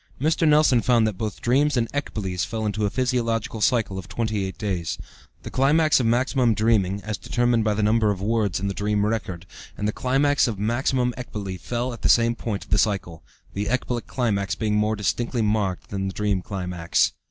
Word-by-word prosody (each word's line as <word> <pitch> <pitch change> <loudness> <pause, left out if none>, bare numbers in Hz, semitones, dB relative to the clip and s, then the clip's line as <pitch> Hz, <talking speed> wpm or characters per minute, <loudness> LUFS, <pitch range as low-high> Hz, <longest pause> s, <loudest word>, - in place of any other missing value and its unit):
Mr. 160 +3 +2
Nelson 150 -5 +5
found 120 -3 +3
that 110 -2 -1
both 105 +1 -5
dreams 140 +4 +2
and 115 -1 +1
ecboles 100 -10 -2
fell 110 -1 -3
into 105 0 0
a - - -1
physiological 115 -2 -1
cycle 105 -4 +1
of 95 - -9
28 100 -1 -2
days. 95 -6 -2 0.5
The - - -7
climax 150 +4 +3
of 120 - +1
maximum 120 0 +2
dreaming 100 -3 +1
(as 110 -2 -4
determined 120 -2 +1
by 105 -1 +1
the 105 - 0
number 110 0 +3
of 100 -2 -1
words 105 -3 0
in 100 - -2
the 100 - -2
dream 105 +1 0
record) 95 -6 -3 0.3
and 105 - -1
the - - +1
climax 140 +4 +2
of 110 -4 -3
maximum 125 +4 0
ecbole 100 -6 -5
fell 120 +7 -3
at 115 - -10
the - - +1
same 115 0 +4
point 110 -4 -4
of - - -20
the 100 - +4
cycle, 100 -6 -1 0.3
the 100 +1 -2
ecbolic 125 -1 -2
climax 100 -6 -1
being 110 -2 -1
more 105 +1 +1
distinctly 115 +4 -1
marked 105 -4 -1
than 95 -1 -2
the 95 - -4
dream 105 -3 0
climax. 90 -3 -1
110 Hz, 200 wpm, -24 LUFS, 100-120 Hz, 0.5 s, Nelson